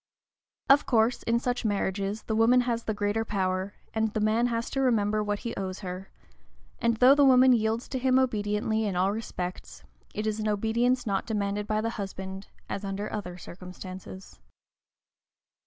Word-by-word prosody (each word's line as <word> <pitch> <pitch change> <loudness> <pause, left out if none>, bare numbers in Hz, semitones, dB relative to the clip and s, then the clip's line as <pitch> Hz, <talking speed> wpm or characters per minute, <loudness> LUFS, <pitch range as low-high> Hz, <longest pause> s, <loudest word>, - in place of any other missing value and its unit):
Of 280 +2 +5
course, 230 0 +2
in 230 0 +1
such 245 0 -2
marriages, 200 0 -1
the 220 - -2
woman 235 +3 +5
has 235 -2 -2
the 220 - -1
greater 205 +2 0
power, 190 -1 -2 0.2
and 220 -1 0
the - - +1
man 220 +3 +2
has 230 -1 -2
to 270 - 0
remember 215 -4 +2
what 205 0 -2
he 235 - -2
owes 190 0 -4
her; 185 0 -6 0.7
and 235 -1 +1
though 255 +3 +7
the 285 0 +4
woman 260 -1 +7
yields 225 0 0
to 260 - -2
him 260 0 +3
obediently 220 -3 0
in 200 -3 -2
all 185 +2 +2
respects, 185 -4 -6 0.3
it 210 - -2
is 215 0 -1
an 215 - -1
obedience 235 +4 +1
not 195 -3 -1
demanded 205 -1 -2
by 215 0 0
the 230 +1 -1
husband, 190 0 -6 0.2
as 200 - -4
under 200 +1 -4
other 180 -4 -5
circumstances. 185 +1 -10
215 Hz, 170 wpm, -28 LUFS, 195-235 Hz, 0.7 s, though